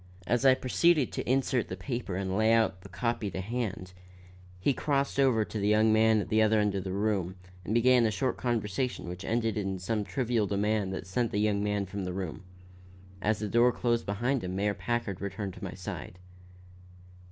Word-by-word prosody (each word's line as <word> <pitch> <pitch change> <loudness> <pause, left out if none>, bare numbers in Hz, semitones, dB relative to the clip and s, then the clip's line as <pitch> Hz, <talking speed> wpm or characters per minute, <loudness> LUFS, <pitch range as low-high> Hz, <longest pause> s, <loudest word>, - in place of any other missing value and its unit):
As 120 +7 +2
I 130 - +7
proceeded 145 +2 +2
to - - -4
insert 130 -2 +1
the 90 - -6
paper 100 0 -4
and 95 0 -2
lay 110 +2 +3
out 110 -5 +2
the 100 - -12
copy 110 +2 -2
to 95 - -5
hand, 95 -3 -4 0.7
he 135 +9 +2
crossed 140 0 -1
over 125 -6 +3
to 110 - -5
the 100 - 0
young 110 +1 +4
man 110 0 +4
at - - -6
the 110 0 +3
other 110 0 +4
end 105 -1 +1
of 95 -2 -2
the 95 - -4
room 100 -2 -1 0.3
and 105 +5 -2
began 120 0 +5
a - - +1
short 130 +4 -1
conversation 120 -1 -2
which 90 +2 -6
ended 115 -1 0
in 95 -2 -2
some 105 +3 -2
trivial 115 -2 0
demand 105 0 0
that 95 - -5
sent 115 +6 -1
the 105 - -3
young 105 -1 +1
man 105 -1 0
from 95 +1 -5
the 90 -1 -3
room. 90 -4 -5 0.8
As 105 +2 +1
the 105 0 -3
door 120 +4 +4
closed 120 -1 -1
behind 120 +5 0
him 90 0 -4
Mayor 100 +1 +1
Packard 120 -4 -3
returned 100 0 -4
to - - -11
my - - -5
side. - - -7
105 Hz, 205 wpm, -29 LUFS, 95-120 Hz, 0.8 s, I